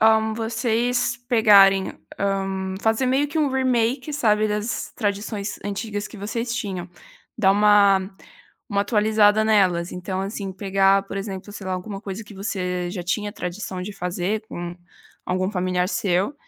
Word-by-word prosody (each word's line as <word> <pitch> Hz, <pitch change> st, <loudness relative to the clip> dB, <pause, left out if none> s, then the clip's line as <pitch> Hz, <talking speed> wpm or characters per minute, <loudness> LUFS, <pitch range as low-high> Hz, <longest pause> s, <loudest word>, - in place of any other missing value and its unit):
hã, 220 Hz, 0 st, +4 dB
vocês 230 Hz, +2 st, 0 dB
pegarem, 200 Hz, -5 st, +6 dB, 0.3 s
hã, 195 Hz, -1 st, -1 dB
fazer 225 Hz, +4 st, +1 dB
meio 270 Hz, +3 st, +2 dB
que 315 Hz, -, -3 dB
um 295 Hz, -2 st, +3 dB
remake, 260 Hz, +2 st, 0 dB
sabe, 215 Hz, -6 st, +2 dB
das 210 Hz, +3 st, -3 dB
tradições 205 Hz, -1 st, -3 dB
antigas 205 Hz, +1 st, -4 dB
que 220 Hz, -, -12 dB
vocês 230 Hz, +4 st, -3 dB
tinham, 190 Hz, -8 st, -4 dB, 0.5 s
dar 195 Hz, -3 st, +5 dB
uma 200 Hz, -1 st, +4 dB, 0.6 s
uma 200 Hz, -2 st, +1 dB
atualizada 215 Hz, 0 st, +3 dB
nelas. 185 Hz, -5 st, +2 dB
Então 185 Hz, +1 st, -4 dB
assim 195 Hz, 0 st, -4 dB
pegar 195 Hz, 0 st, +3 dB
por 195 Hz, -, -7 dB
exemplo, 195 Hz, 0 st, -6 dB
sei 200 Hz, -2 st, -8 dB
lá, 185 Hz, -, -1 dB
alguma 195 Hz, +2 st, -6 dB
coisa 205 Hz, +1 st, -6 dB
que 210 Hz, -, -13 dB
você 180 Hz, -3 st, -3 dB
já 180 Hz, -1 st, -5 dB
tinha 205 Hz, +4 st, -2 dB
tradição 180 Hz, -1 st, -5 dB
de 205 Hz, +3 st, -6 dB
fazer 180 Hz, +2 st, -2 dB
com 175 Hz, 0 st, -6 dB, 0.5 s
algum 185 Hz, +1 st, 0 dB
familiar 180 Hz, -2 st, 0 dB
seu 195 Hz, +7 st, 0 dB
205 Hz, 150 wpm, -23 LUFS, 190-220 Hz, 0.6 s, pegarem